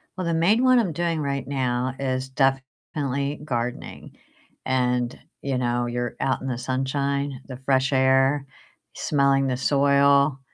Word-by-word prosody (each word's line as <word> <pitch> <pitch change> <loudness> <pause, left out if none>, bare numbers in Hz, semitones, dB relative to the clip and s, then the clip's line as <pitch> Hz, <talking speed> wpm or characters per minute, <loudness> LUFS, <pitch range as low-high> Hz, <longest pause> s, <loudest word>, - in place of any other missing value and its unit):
Well, 185 -2 -4
the 165 - 0
main 200 +10 +3
one 255 -1 +5
I'm 185 -8 0
doing 170 -1 -1
right 140 -1 -3
now 130 -1 -1
is 130 -1 -2
definitely 135 +1 -2
gardening, 120 -4 -5 0.5
and, 125 -1 0 0.2
you 135 -2 -2
know, 120 -1 0
you're 120 0 -3
out 135 -1 0
in 135 - -5
the 125 -2 -2
sunshine, 135 +1 -2
the 130 -2 -7
fresh 135 +1 +2
air, 135 +2 +3 0.5
smelling 140 -2 +2
the 125 -1 -1
soil, 140 0 +3
135 Hz, 140 wpm, -24 LUFS, 130-140 Hz, 0.5 s, one